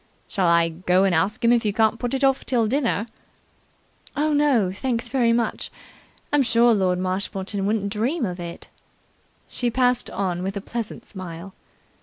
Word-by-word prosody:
"Shall 190 -4 0
I 170 0 +4
go 180 +3 +1
and 195 -2 +2
ask 210 +9 0
him 230 - +5
if 240 -1 +3
you 210 - +1
can't 220 +1 +2
put 245 +1 -2
it 270 - -2
off 270 0 +3
till 245 -3 +1
after 215 - 0
dinner?" 235 -6 0 1.1
"Oh, 305 +1 +1
no, 275 -10 +3
thanks 235 +3 -3
very 245 -3 +2
much. 235 0 -1 0.6
I'm 290 - +5
sure 235 -1 +4
Lord 185 -3 +1
Marshmoreton 195 +2 -2
wouldn't 205 -1 0
dream 245 +7 0
of 180 -2 -5
it." 170 -1 -7 0.8
She 245 - -1
passed 250 0 +1
on 180 -3 -2
with 195 +2 -3
a - - -1
pleasant 230 +1 -6
smile. 185 -1 -8
220 Hz, 175 wpm, -23 LUFS, 185-245 Hz, 1.1 s, him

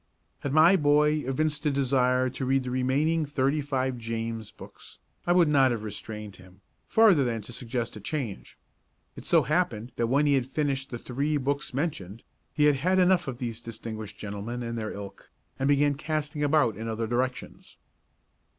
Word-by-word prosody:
Had 140 - -3
my 160 +5 +6
boy 150 -1 +3
evinced 150 +3 -1
a - - +4
desire 130 -2 +2
to 130 +2 -5
read 135 +1 +1
the 125 - -4
remaining 140 +6 +1
thirty 145 0 0
five 130 -3 -2
James 115 -1 -4
books, - - -14 0.3
I - - +3
would 175 -2 +5
not 135 -3 +4
have 115 -3 -2
restrained 105 -1 -7
him, 95 +1 -17 0.3
farther 210 -10 +5
than 115 -3 -2
to 120 - -10
suggest 120 -1 -4
a - - -7
change. 115 -1 -5 0.6
It - - -10
so 165 -3 +4
happened 130 -6 -1
that 115 - +1
when 140 +5 +2
he 145 - +3
had 130 -2 +1
finished 135 -1 -2
the 120 - -5
three 140 +6 -1
books 140 +1 -2
mentioned 115 - -4 0.3
he 150 - 0
had 150 -2 +5
had 185 +7 +1
enough 180 -2 +3
of 130 -3 -4
these 120 -2 -5
distinguished 110 -2 -7
gentlemen 105 +4 -5
and 115 0 -4
their 110 -2 -3
ilk, 100 -1 -9 0.3
and 135 - +1
began 145 0 +3
casting 150 0 -3
about 145 -6 +3
in 110 +3 -6
other 115 0 -2
directions. 125 +3 -3
130 Hz, 180 wpm, -27 LUFS, 115-150 Hz, 0.6 s, my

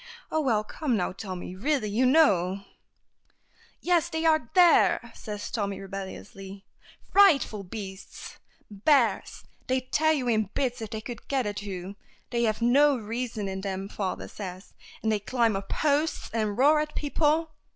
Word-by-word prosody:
Oh, 315 - +1
well, 225 -7 +1
come 250 +2 -2
now, 180 - -1
Tommy, 185 -2 -7
really, 265 +3 0
you 250 +5 +2
know 200 - +3 0.6
" - - -43 0.3
"Yes; 345 -1 +2
they 320 -1 -2
are 310 -7 +3
there," 355 -2 +5
says 210 -2 -7
Tommy, 200 -3 -2
rebelliously. 195 0 -8 0.5
"Frightful 310 - +4
beasts! 190 0 -9 0.3
Bears! 235 +4 +1 0.2
They'd 255 0 -1
tear 315 +1 +3
you 275 -5 0
in 215 -4 +1
bits 250 -3 -1
if 220 - -5
they 220 +1 -5
could 240 +1 -9
get 270 -3 0
at 205 0 -3
you. 195 -1 -7 0.3
They 235 -1 +1
have 215 +1 -1
no 280 +3 +5
reason 225 -1 -4
in 190 0 -4
them, 195 0 -4
father 195 -2 -4
says. 185 -2 -9 0.3
And 220 - +1
they 215 - +1
climb 230 0 +1
up 195 0 -5
posts, 300 +1 0
and 215 -3 -1
roar 295 +4 +5
at 300 0 -3
people." 310 +2 +1
225 Hz, 160 wpm, -27 LUFS, 200-285 Hz, 0.6 s, there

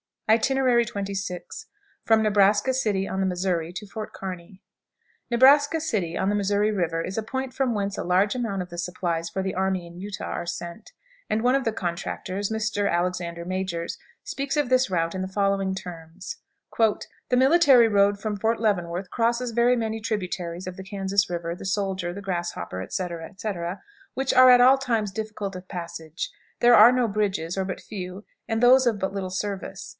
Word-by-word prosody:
XXVI. 220 -6 +1 0.7
From 220 -1 +4
Nebraska 205 +3 +3
City, 210 -7 0
on 190 - -3
the 190 - +1
Missouri, 180 -2 -1
to 210 - -6
Fort 215 +2 -7
Kearney. 185 0 -8 0.7
Nebraska 285 +6 +5
City, 195 - -2
on 190 - 0
the 205 - +1
Missouri 205 +1 +1
River, 170 -5 -1
is 190 - -5
a - - +1
point 260 +3 -4
from 260 -4 0
whence 200 -1 -2
a - - -2
large 185 +4 +2
amount 225 -7 -2
of 180 - -7
the 175 - -9
supplies 170 -1 -2
for 190 - -3
the 190 0 -2
army 190 -1 -1
in 170 0 -12
Utah 200 +1 -5
are 175 - -3
sent, 175 +3 -7 0.4
and 215 - +1
one 250 +1 +4
of 270 -1 +1
the 225 - 0
contractors, 185 +2 -3
Mr. 215 -2 -1
Alexander 175 -1 -2
Majors, 185 -2 -3 0.3
speaks 275 +2 -3
of 295 -4 +1
this 255 -3 +3
route 165 -2 0
in 190 - -3
the 190 - -2
following 195 -1 0
terms: 175 0 -8 0.4
"The 220 -2 +3 0.3
military 265 -4 +6
road 200 -1 +3
from 210 0 -3
Fort 225 +2 +1
Leavenworth 180 -3 -1
crosses 235 +2 0
very 240 +2 +3
many 225 -2 -2
tributaries 180 -5 -3
of 185 0 -7
the 190 - -7
Kansas 195 0 0
River, 170 -1 -3
the 180 - -10
Soldier, 190 -2 -1
the 200 - -7
Grasshopper, 175 - -4
etc., 170 - -4
etc., 190 -3 -5 0.3
which 265 0 0
are 255 0 +8
at 245 -1 +8
all 260 +2 +7
times 230 -6 -1
difficult 210 -1 -5
of 185 0 -12
passage. 170 -3 -6 0.3
There 240 0 +6
are 235 +2 +9
no 250 -3 +1
bridges, 195 -4 -1
or 190 - 0
but 185 - -5
few, 185 -1 -7 0.2
and 225 +1 -1
those 255 +1 +6
of 225 -3 +2
but 190 0 -2
little 195 -2 -3
service. 195 0 -5
195 Hz, 180 wpm, -25 LUFS, 180-225 Hz, 0.7 s, are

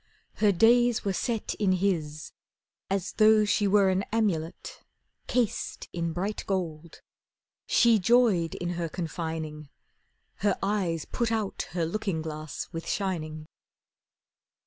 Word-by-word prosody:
Her 210 -2 +4
days 235 +4 +4
were 195 - +1
set 225 +3 -2
In 195 -3 +3
his 165 -6 -1 0.6
as 195 -1 -1
though 215 0 +5
she 205 0 +2
were 200 -1 +4
an 190 0 +1
amulet 190 -8 -2 0.5
Cased 245 -4 -1
in 170 -1 -2
bright 190 +6 -3
gold. 170 -4 -4 0.6
She 235 -3 +5
joyed 200 -5 +3
in 175 - -3
her 170 -1 -3
confining; 160 -3 -5 0.7
Her 205 -1 +1
eyes 190 -6 0
put 235 -1 -1
out 220 -3 -2
her 170 -2 0
looking 175 -2 -2
glass 155 -1 -5
with 165 -2 -6
shining. 155 -6 -3
185 Hz, 125 wpm, -28 LUFS, 165-210 Hz, 0.7 s, though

